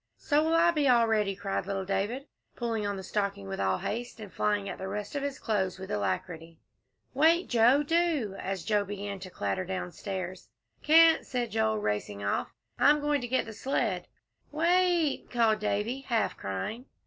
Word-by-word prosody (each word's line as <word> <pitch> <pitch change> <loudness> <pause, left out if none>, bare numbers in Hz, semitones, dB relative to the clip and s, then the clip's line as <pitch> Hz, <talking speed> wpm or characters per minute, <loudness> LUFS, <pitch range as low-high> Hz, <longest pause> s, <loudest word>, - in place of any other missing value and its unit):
"So 295 0 +2
will 325 +1 +2
I 340 +1 +5
be 300 -4 +1
all 240 -2 +5
ready," 210 -3 +1
cried 195 -1 -3
little 195 -1 -2
David, 205 +8 -2 0.3
pulling 225 -3 -2
on 200 -1 -2
the 190 - -6
stocking 200 - -2
with 95 - -5
all 95 -1 +1
haste, 235 - -4
and 205 -3 -9
flying 205 -1 0
at - - -6
the 190 - -4
rest 205 +1 -5
of 285 - -2
his 280 -1 -3
clothes 190 -5 -1
with 190 0 -8
alacrity. 160 - -3 0.6
"Wait, 330 +5 +4
Joe 245 +5 +4
do," 315 - +1
as 190 -3 -3
Joel 210 -2 +1
began 200 0 -5
to 185 0 -8
clatter 100 - -2
downstairs. 185 0 -5 0.3
"Can't," 325 +1 +6
said 245 -3 -3
Joel, 220 0 +1
racing 105 - -2
off, 100 - -1 0.3
"I'm 295 +1 +5
going 295 -1 0
to 245 - -4
get 260 +2 +1
the 225 - -8
sled." 260 +7 -1 0.4
"Wa 310 +2 -1
it," 350 -5 +2
called 225 -3 +2
Davie, 210 +4 -1
half 235 -4 0
crying. 100 - -4
215 Hz, 185 wpm, -29 LUFS, 190-275 Hz, 0.6 s, Can't